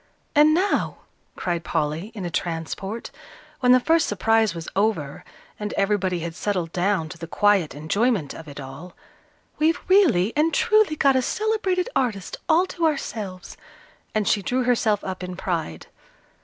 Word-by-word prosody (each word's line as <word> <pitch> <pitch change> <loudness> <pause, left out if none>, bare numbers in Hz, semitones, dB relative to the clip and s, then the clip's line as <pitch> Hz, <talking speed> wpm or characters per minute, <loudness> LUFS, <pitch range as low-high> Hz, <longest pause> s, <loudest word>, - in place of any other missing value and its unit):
"And 300 0 +6
now," 380 +4 0 0.3
cried 175 -2 -2
Polly, 160 +5 -2
in 195 -4 -5
a 175 - -4
transport, 175 +7 -4 0.5
when 250 -1 +4
the 255 - +7
first 325 +4 +2
surprise 220 0 +2
was 165 -1 -6
over, 190 -9 0 0.4
and 210 0 -4
everybody 195 -3 0
had 170 0 -4
settled 180 -3 -2
down 180 -2 0
to 170 - -10
the 165 - -6
quiet 200 -4 +2
enjoyment 175 - 0
of 165 - -10
it 145 -1 -9
all, 140 +6 -9 0.6
"we've 320 +2 +2
really 315 - +4
and 310 +2 +2
truly 430 -7 +3
got 275 -2 +3
a 260 - +3
celebrated 420 - 0
artist 215 -7 -1
all 335 +3 +5
to 340 -3 0
ourselves," 210 - -4 0.6
and 215 -2 +1
she 210 - +2
drew 250 +5 0
herself 225 -4 +1
up 185 -1 -5
in 180 0 -5
pride. 165 - -3
205 Hz, 155 wpm, -23 LUFS, 170-265 Hz, 0.6 s, the